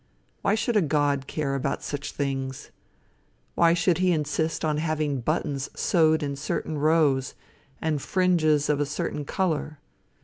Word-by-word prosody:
Why 200 Hz, -, +2 dB
should 225 Hz, +1 st, -1 dB
a 210 Hz, -, +5 dB
God 145 Hz, -3 st, +1 dB
care 145 Hz, -3 st, -2 dB
about 140 Hz, 0 st, -2 dB
such 145 Hz, 0 st, -4 dB
things? 135 Hz, -2 st, -4 dB, 0.8 s
Why 170 Hz, 0 st, +4 dB
should 175 Hz, 0 st, +2 dB
he 185 Hz, -1 st, +3 dB
insist 160 Hz, 0 st, -1 dB
on 155 Hz, -1 st, 0 dB
having 155 Hz, -3 st, -1 dB
buttons 140 Hz, 0 st, -1 dB
sewed 160 Hz, -3 st, +3 dB
in 140 Hz, -1 st, -2 dB
certain 150 Hz, +2 st, -3 dB
rows, 145 Hz, -4 st, +2 dB, 0.4 s
and 155 Hz, -3 st, -1 dB
fringes 155 Hz, -5 st, +2 dB
of 150 Hz, -1 st, +1 dB
a 145 Hz, -, +1 dB
certain 145 Hz, 0 st, -3 dB
color? 155 Hz, -4 st, -1 dB
150 Hz, 145 wpm, -26 LUFS, 140-165 Hz, 0.8 s, a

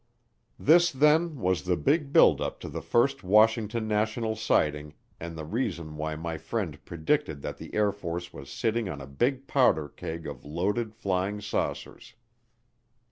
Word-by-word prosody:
This 170 Hz, +3 st, +5 dB
then 150 Hz, +4 st, +3 dB
was 90 Hz, -2 st, +1 dB
the 90 Hz, -1 st, 0 dB
big 145 Hz, 0 st, +1 dB
build -, -, +6 dB
up -, -, -3 dB
to -, -, -6 dB
the -, -, -5 dB
first 135 Hz, +2 st, +1 dB
Washington 110 Hz, +3 st, +3 dB
national 110 Hz, +1 st, 0 dB
sighting 75 Hz, -9 st, 0 dB, 0.2 s
and 85 Hz, 0 st, -7 dB
the 80 Hz, -, -5 dB
reason 85 Hz, -6 st, -3 dB
why 75 Hz, +1 st, -3 dB
my 80 Hz, 0 st, -5 dB
friend 90 Hz, -3 st, -4 dB
predicted 80 Hz, -3 st, -1 dB
that -, -, -5 dB
the -, -, -9 dB
Air 105 Hz, -1 st, +3 dB
Force 85 Hz, -3 st, -6 dB
was 70 Hz, 0 st, -10 dB
sitting 110 Hz, -, -1 dB
on 75 Hz, -, -5 dB
a 70 Hz, -, -8 dB
big 125 Hz, -, -1 dB
powder 120 Hz, -, +3 dB
keg 80 Hz, +3 st, -7 dB
of -, -, -7 dB
loaded 100 Hz, +9 st, -2 dB
flying 100 Hz, -1 st, -1 dB
saucers. 105 Hz, +1 st, -4 dB
100 Hz, 160 wpm, -28 LUFS, 80-115 Hz, 0.2 s, build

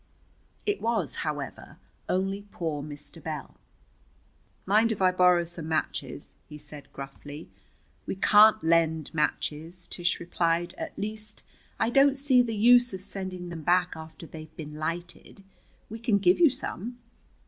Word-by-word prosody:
It 410 Hz, -1 st, 0 dB
was, 225 Hz, -9 st, -1 dB
however, 145 Hz, -3 st, -5 dB, 0.3 s
only 195 Hz, +2 st, -1 dB
poor 160 Hz, -4 st, -3 dB
Mr. 150 Hz, +2 st, -10 dB
Bell. 155 Hz, -3 st, -6 dB, 1.1 s
"Mind 215 Hz, +4 st, +4 dB
if 215 Hz, -, -2 dB
I 185 Hz, -1 st, +4 dB
borrow 180 Hz, -1 st, +4 dB
some 170 Hz, -1 st, -7 dB
matches?" 160 Hz, -1 st, -3 dB, 0.2 s
he 150 Hz, -, -8 dB
said 150 Hz, -1 st, -11 dB
gruffly. 145 Hz, +2 st, -9 dB, 0.6 s
"We -, -, -2 dB
can't 215 Hz, +3 st, +6 dB
lend 160 Hz, -1 st, +2 dB
matches," 160 Hz, +3 st, -2 dB
Tish 175 Hz, 0 st, -1 dB
replied. 170 Hz, 0 st, 0 dB
"At -, -, -6 dB
least, 215 Hz, +1 st, -5 dB, 0.4 s
I 230 Hz, -, +2 dB
don't 275 Hz, +1 st, +5 dB
see 270 Hz, -2 st, +4 dB
the 225 Hz, -3 st, -2 dB
use 245 Hz, 0 st, +6 dB
of 185 Hz, -, -8 dB
sending 185 Hz, -2 st, -6 dB
them 170 Hz, -2 st, -6 dB
back 180 Hz, +3 st, +2 dB
after 160 Hz, +1 st, -10 dB
they've 155 Hz, -1 st, -11 dB
been 150 Hz, -2 st, -7 dB
lighted. 170 Hz, +5 st, -5 dB, 0.4 s
We 225 Hz, +1 st, -8 dB
can 225 Hz, -3 st, +2 dB
give 185 Hz, -2 st, +4 dB
you 330 Hz, -, +7 dB
some." 245 Hz, -2 st, -5 dB
175 Hz, 145 wpm, -28 LUFS, 160-215 Hz, 1.1 s, you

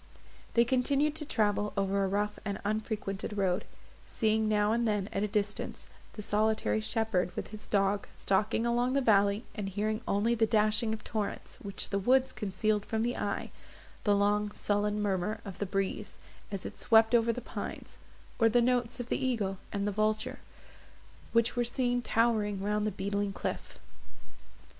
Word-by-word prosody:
They 235 Hz, 0 st, +6 dB
continued 275 Hz, +4 st, +2 dB
to 300 Hz, -, -5 dB
travel 210 Hz, -4 st, +1 dB
over 195 Hz, 0 st, +1 dB
a -, -, +1 dB
rough 205 Hz, +2 st, -1 dB
and 200 Hz, -1 st, -3 dB
unfrequented 210 Hz, -1 st, -2 dB
road, 185 Hz, -2 st, +1 dB, 0.4 s
seeing 220 Hz, 0 st, +1 dB
now 210 Hz, 0 st, +3 dB
and 235 Hz, +1 st, +1 dB
then 205 Hz, -2 st, 0 dB
at -, -, 0 dB
a 210 Hz, -, +1 dB
distance 205 Hz, 0 st, -3 dB, 0.2 s
the 210 Hz, -, -7 dB
solitary 205 Hz, -, +1 dB
shepherd, 185 Hz, -, 0 dB
with -, -, -4 dB
his 215 Hz, 0 st, -8 dB
dog, 200 Hz, 0 st, +1 dB
stalking 210 Hz, +4 st, +1 dB
along 240 Hz, +2 st, +1 dB
the 275 Hz, -, +2 dB
valley, 205 Hz, -2 st, +3 dB
and 205 Hz, -4 st, -4 dB
hearing 215 Hz, +3 st, -1 dB
only 210 Hz, +4 st, +2 dB
the 225 Hz, -1 st, +2 dB
dashing 215 Hz, +1 st, +2 dB
of 220 Hz, -1 st, -4 dB
torrents, 215 Hz, -3 st, -4 dB
which 200 Hz, -1 st, -3 dB
the 200 Hz, -, 0 dB
woods 260 Hz, +5 st, +3 dB
concealed 210 Hz, 0 st, -1 dB
from 220 Hz, +1 st, -1 dB
the 240 Hz, +1 st, 0 dB
eye, 205 Hz, -, -3 dB, 0.5 s
the 205 Hz, -1 st, +4 dB
long 205 Hz, +1 st, +2 dB
sullen 205 Hz, 0 st, 0 dB
murmur 205 Hz, +2 st, -1 dB
of 195 Hz, -3 st, -8 dB
the 205 Hz, -, -1 dB
breeze, 195 Hz, +2 st, -2 dB, 0.3 s
as 195 Hz, -2 st, -4 dB
it -, -, -7 dB
swept 225 Hz, 0 st, +5 dB
over 230 Hz, -1 st, +4 dB
the 230 Hz, -, -4 dB
pines, 240 Hz, -, -7 dB, 0.4 s
or 225 Hz, -1 st, +5 dB
the 240 Hz, +2 st, +4 dB
notes 245 Hz, 0 st, +1 dB
of 245 Hz, 0 st, -5 dB
the -, -, -1 dB
eagle 205 Hz, -7 st, -1 dB
and 200 Hz, 0 st, -1 dB
the -, -, +1 dB
vulture, 215 Hz, +1 st, 0 dB, 0.9 s
which 230 Hz, 0 st, +2 dB
were 245 Hz, -, +2 dB
seen 245 Hz, 0 st, 0 dB
towering 220 Hz, -4 st, +1 dB
round 210 Hz, +2 st, 0 dB
the -, -, +2 dB
beetling 200 Hz, +1 st, -2 dB
cliff. -, -, -5 dB
210 Hz, 170 wpm, -30 LUFS, 200-230 Hz, 0.9 s, They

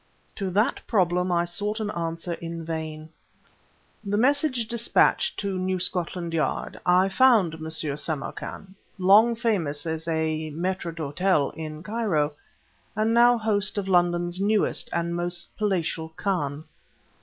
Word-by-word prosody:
To 195 Hz, -2 st, -2 dB
that 205 Hz, +5 st, +1 dB
problem 180 Hz, -3 st, +1 dB
I 170 Hz, 0 st, +2 dB
sought 205 Hz, +5 st, -2 dB
an 210 Hz, -1 st, -2 dB
answer 165 Hz, 0 st, -3 dB
in 165 Hz, 0 st, -6 dB
vain. 160 Hz, -1 st, -5 dB, 0.9 s
The 205 Hz, 0 st, -1 dB
message 260 Hz, -1 st, +2 dB
despatched 235 Hz, -, +2 dB
to 195 Hz, -2 st, -2 dB
New 185 Hz, 0 st, 0 dB
Scotland 175 Hz, -1 st, -2 dB
Yard, 155 Hz, -4 st, -2 dB
I 180 Hz, +2 st, +5 dB
found 215 Hz, -6 st, +4 dB
M. 160 Hz, 0 st, -6 dB
Samarkan, 155 Hz, +4 st, -3 dB, 0.2 s
long 205 Hz, +5 st, +5 dB
famous 170 Hz, -11 st, -1 dB
as 160 Hz, 0 st, -3 dB
a 160 Hz, -1 st, -1 dB
mâitre 180 Hz, 0 st, -2 dB
d' 165 Hz, -, -16 dB, 0.2 s
hôtel 185 Hz, -6 st, +2 dB
in 155 Hz, -1 st, -7 dB
Cairo, 195 Hz, -10 st, 0 dB, 0.6 s
and 215 Hz, +2 st, +1 dB
now 240 Hz, +1 st, +6 dB
host 210 Hz, -3 st, 0 dB
of 200 Hz, -1 st, -2 dB
London's 175 Hz, -1 st, +2 dB
newest 210 Hz, +1 st, +1 dB
and 170 Hz, 0 st, -1 dB
most 175 Hz, 0 st, -4 dB
palatial 170 Hz, -6 st, -1 dB
khan. 160 Hz, -5 st, -2 dB
180 Hz, 135 wpm, -25 LUFS, 160-210 Hz, 0.9 s, now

